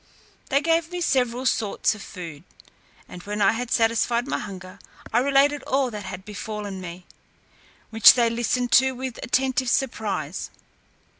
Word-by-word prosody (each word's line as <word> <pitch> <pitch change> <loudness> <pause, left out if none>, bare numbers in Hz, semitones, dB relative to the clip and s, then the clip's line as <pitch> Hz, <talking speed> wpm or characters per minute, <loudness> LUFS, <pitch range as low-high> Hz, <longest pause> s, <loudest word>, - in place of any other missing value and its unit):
They 275 +1 +2
gave 330 +1 +1
me 355 - -4
several 255 -6 0
sorts 220 -4 +1
of 215 - -11
food, 165 -7 -9 0.6
and 180 - -10
when 205 +3 -5
I 200 - +4
had 240 +1 -4
satisfied 230 +1 +1
my - - -1
hunger, 190 -2 -9 0.3
I 235 - +4
related 280 +2 +3
all 265 -2 +1
that 210 -2 -7
had 185 0 -8
befallen 210 -2 -6
me, 175 0 -9 0.9
which 225 -2 +8
they 240 -2 +3
listened 240 +1 -1
to 265 +1 +5
with 255 -1 -6
attentive 260 0 0
surprise. 200 - -2
230 Hz, 150 wpm, -24 LUFS, 200-260 Hz, 0.9 s, which